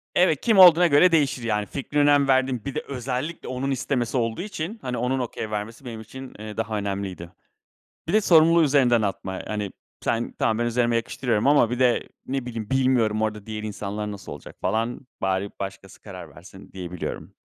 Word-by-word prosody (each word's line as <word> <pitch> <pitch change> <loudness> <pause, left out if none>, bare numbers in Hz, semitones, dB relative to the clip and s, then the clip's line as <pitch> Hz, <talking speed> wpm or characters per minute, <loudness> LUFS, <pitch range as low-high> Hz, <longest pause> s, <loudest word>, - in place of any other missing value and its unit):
Evet, 175 -5 +3
kim 220 -4 +2
olduğuna 175 -1 +9
göre 165 +4 +5
değişir 140 -6 +1
yani. 105 -2 0
Fikrine 140 +5 -2
önem 145 -1 +4
verdiğim, 130 -3 +1
bir 140 - -5
de 155 - -1
özellikle 135 +4 -4
onun 130 +2 -2
istemesi 130 -1 -1
olduğu 115 +1 -1
için, 200 +1 -5
hani 125 -1 -3
onun 125 +2 0
okay 110 -3 -4
vermesi 110 +5 -5
benim 115 -2 -7
için, 130 +4 -10
eee, 105 0 -8
daha 110 -1 -2
önemliydi. 100 -4 -4 0.8
Bir - - -2
de 215 - +5
sorumluluğu 165 -1 +5
üzerinden 130 -5 +3
atma, 95 -2 -3
hani 105 -2 -3 0.3
sen, 115 +1 -1
tamam 110 -1 +1
ben 120 - +1
üzerime 120 0 +1
yakıştırıyorum 115 0 0
ama 140 -5 +5
bir 125 - -3
de 125 -2 +3 0.2
ne 135 -2 -2
bileyim, 115 -3 -6
bilmiyorum 125 -5 +2
orada 105 -2 -2
diğer 110 -1 -6
insanlar 105 0 -4
nasıl 100 -2 -9
olacak - - -10
falan, 115 +6 -2
bari 95 +1 0
başkası 95 0 -7
karar - - -10
versin 95 +2 -14
diyebiliyorum. 90 -2 -6
120 Hz, 180 wpm, -24 LUFS, 105-135 Hz, 0.8 s, olduğuna